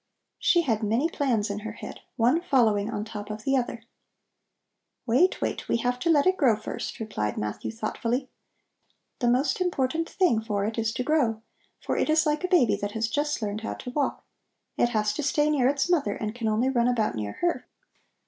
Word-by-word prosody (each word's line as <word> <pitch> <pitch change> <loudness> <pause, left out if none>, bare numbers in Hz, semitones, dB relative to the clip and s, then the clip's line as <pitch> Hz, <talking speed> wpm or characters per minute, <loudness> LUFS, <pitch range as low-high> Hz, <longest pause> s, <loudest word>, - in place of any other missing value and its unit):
She 345 -1 +3
had 225 -7 0
many 225 +8 +1
plans 240 -10 0
in 205 - -3
her 220 +1 -6
head, - - -9 0.2
one 255 +7 +3
following 220 - +2
on 210 -2 -3
top 210 -1 -7
of 215 0 -6
the 270 +3 +2
other. 240 -2 -2 1.2
"Wait, 260 +10 +3
wait; - - -3
we - - +3
have 245 +1 -1
to 335 - -1
let 295 -3 +4
it 370 0 +3
grow 250 -7 +4
first," 215 - -6
replied 105 - -3
Matthew 105 0 -3
thoughtfully. 230 +3 -2 0.9
"The 245 - +1
most 255 +9 +2
important 330 -2 0
thing 355 - +2
for 205 -3 -1
it 220 +2 -2
is 225 0 0
to 250 - -1
grow, 245 -7 +1 0.4
for - - -2
it - - +1
is 310 +1 +4
like 300 +2 0
a - - +1
baby 345 - +4
that 205 0 -4
has 225 0 -1
just 290 -2 -1
learned 210 +1 -3
how 225 - -4
to 250 - -7
walk. 285 +2 -1 0.5
It 240 - +2
has 210 -2 0
to 300 - -3
stay 295 +1 +2
near 265 -4 +3
its 280 +1 0
mother 290 - +1
and 215 0 -4
can 235 -2 -3
only 220 +4 +2
run 240 -2 +2
about 230 - +1
near 105 -3 -4
her. 345 0 -1
240 Hz, 205 wpm, -26 LUFS, 215-290 Hz, 1.2 s, let